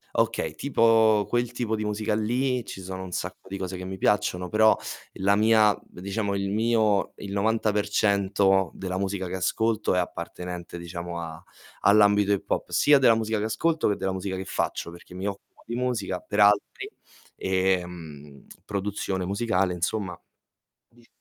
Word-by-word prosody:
Okay, 80 -1 0
tipo 115 -5 +3
quel 120 0 0
tipo 120 -2 -2
di 110 - -3
musica 105 +1 -1
lì 125 +3 0
ci 95 - -8
sono 95 0 -6
un 95 - -8
sacco - - -5
di 100 - -4
cose 95 -1 -4
che 90 - -7
mi 95 +1 -5
piacciono, 95 -3 +1
però 110 0 +5 0.4
la 100 +1 +2
mia 110 -1 +4
diciamo 100 +3 -3
il 100 0 -1
mio 110 -1 +2
il 100 - -7
90% 100 -3 +2
della 95 -1 -4
musica 95 -1 -2
che 95 - -4
ascolto 110 +4 0
è 90 - +2
appartenente, 90 0 -5
diciamo, 85 0 -6
a 80 -1 -7 0.4
all'ambito 105 0 +5
hip 100 - -1
hop, - - -1
sia 145 0 +5
della 120 -4 +6
musica 110 0 -1
che 105 - -1
ascolto 155 +9 +1
che 105 - 0
della 95 -1 -2
musica 95 0 -3
che 95 - -5
faccio, 85 - -2
perché 85 +1 -14
mi 95 +2 -4
occupo 100 0 -8
di 115 - -4
musica 120 -7 -1
per 105 - -4
altri, 105 0 +3 0.5
ehm, 90 -7 -2 0.2
produzione 100 -2 -2
musicale, 95 -2 0
insomma 90 +2 -2 0.7
di 120 0 -23
100 Hz, 160 wpm, -26 LUFS, 95-110 Hz, 0.7 s, della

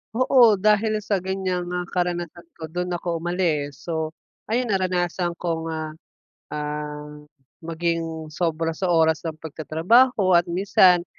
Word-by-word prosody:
Oo, 245 -3 +5
dahil 215 +1 +2
sa 200 -2 0
ganyang 185 -1 -2
ah, 180 - -1
karanasan 175 -1 -3
ko 160 - -11
do'n 180 0 -2
ako 170 -1 -3
umalis. 160 -5 -1
So, 160 -1 -3 0.3
ayun 235 0 0
naranasan 180 -2 0
kong 165 -1 -3
ah, 155 -1 -4 0.6
ah, 150 0 -5 0.4
maging 165 -1 -3
sobra 165 0 -1
sa 185 +3 -2
oras 160 -2 +3
ng 160 -2 -5
pagtatrabaho 180 - +2
at 175 0 +4
minsan 180 -1 +4
175 Hz, 130 wpm, -23 LUFS, 160-185 Hz, 0.6 s, Oo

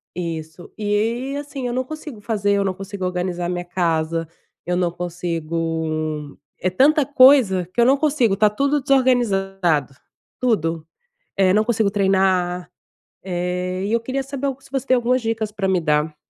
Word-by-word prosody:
isso. 165 -1 -6
E 225 +6 -1
assim, 285 -2 -6
eu 240 - -3
não 255 +1 0
consigo 300 -4 -8
fazer, 205 -2 0
eu 200 - +2
não 190 -1 -1
consigo 195 0 -6
organizar 180 -1 -2
a - - -2
minha 175 0 -2
casa, 165 -2 -1 0.4
eu 180 - 0
não 175 -1 +1
consigo 165 -3 -3 0.2
é 185 - 0
tanta 290 - +4
coisa, 255 -10 +5
que 240 - +2
eu - - +5
não 270 +3 +5
consigo, 275 -8 +2
tá 210 +1 +4
tudo 280 +7 +1
desorganizado. 195 - +1 0.5
Tudo, 165 -10 0 0.5
eh, 190 -1 +3
não 215 +2 +4
consigo 220 -4 +1
treinar, 190 -3 +1 0.5
eh, 180 0 -2
e 205 - -2
eu 230 - +2
queria 265 +3 -3
saber 275 +1 -3
se 275 0 -19
você 270 0 -2
tem 255 - +4
algumas 250 +1 +1
dicas 225 -1 -2
pra 195 -2 -2
me 185 -2 +2
dar. 150 -1 0
195 Hz, 165 wpm, -21 LUFS, 175-245 Hz, 0.5 s, coisa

